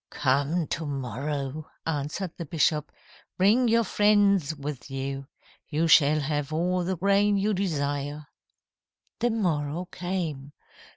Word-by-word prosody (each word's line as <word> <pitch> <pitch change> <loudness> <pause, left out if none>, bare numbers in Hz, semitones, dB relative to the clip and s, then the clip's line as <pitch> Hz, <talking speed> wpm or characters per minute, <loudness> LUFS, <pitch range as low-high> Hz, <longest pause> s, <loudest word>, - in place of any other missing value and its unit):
"'Come 145 +5 +1
to 160 - -3
morrow,' 140 +3 -4 0.2
answered 160 +4 -2
the 170 - -6
bishop. 150 -1 +1 0.5
'Bring 220 +7 +4
your 230 0 +4
friends 200 -8 +3
with 140 -2 -6
you. 135 0 -4 0.4
You 160 +2 +1
shall 155 -1 +5
have 145 0 -2
all 180 +3 0
the 185 +1 -2
grain 200 +2 +3
you 205 +2 +1
desire.' 145 -5 -2 0.9
"The 240 - +2
morrow 170 -6 -1
came. 165 -6 -4
155 Hz, 120 wpm, -27 LUFS, 145-190 Hz, 0.9 s, shall